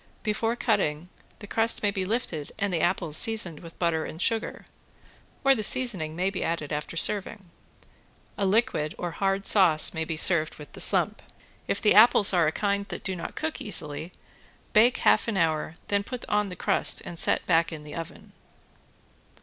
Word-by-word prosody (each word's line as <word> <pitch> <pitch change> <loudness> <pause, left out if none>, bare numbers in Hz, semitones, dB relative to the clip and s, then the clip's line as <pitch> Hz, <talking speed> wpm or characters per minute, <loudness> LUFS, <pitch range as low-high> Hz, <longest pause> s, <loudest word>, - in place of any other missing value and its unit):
Before 225 +2 -1
cutting, 180 -9 -1 0.3
the 205 - -11
crust 225 +2 0
may 205 - +2
be 190 -2 -3
lifted 185 -9 -4
and 200 -3 -2
the 165 - 0
apples 175 -3 0
seasoned 190 -6 +1
with 165 -1 -13
butter 165 -2 0
and 160 - -8
sugar, 225 +4 -2 0.8
or 270 0 +5
the 230 - -2
seasoning 205 -10 -2
may 185 +3 -1
be 195 - -4
added 155 -3 -3
after 150 +2 -5
serving. 195 0 0 0.8
A 200 - -1
liquid 200 -7 0
or 175 - -4
a - - -8
hard 195 +3 -1
sauce 175 -7 +4
may 160 - -2
be 160 0 -5
served 155 -1 +3
with 150 - -12
the - - -4
slump. - - +2 0.5
If - - -1
the 210 - +4
apples 215 -2 +6
are 170 -3 +3
a - - +1
kind 200 +2 -2
that - - -8
do 190 - -3
not 170 - -7
cook 155 - -4
easily 150 +3 0 0.6
bake 235 +2 +4
half - - +2
an 220 -4 -2
hour, 160 -2 -1
then 200 0 +1
put 250 +3 -7
on 210 -1 0
the 180 - -8
crust - - +1
and 170 - -7
set - - +1
back 165 -1 +2
in 155 -2 -8
the 150 - -11
oven. 165 -1 -9
185 Hz, 190 wpm, -26 LUFS, 160-210 Hz, 0.8 s, apples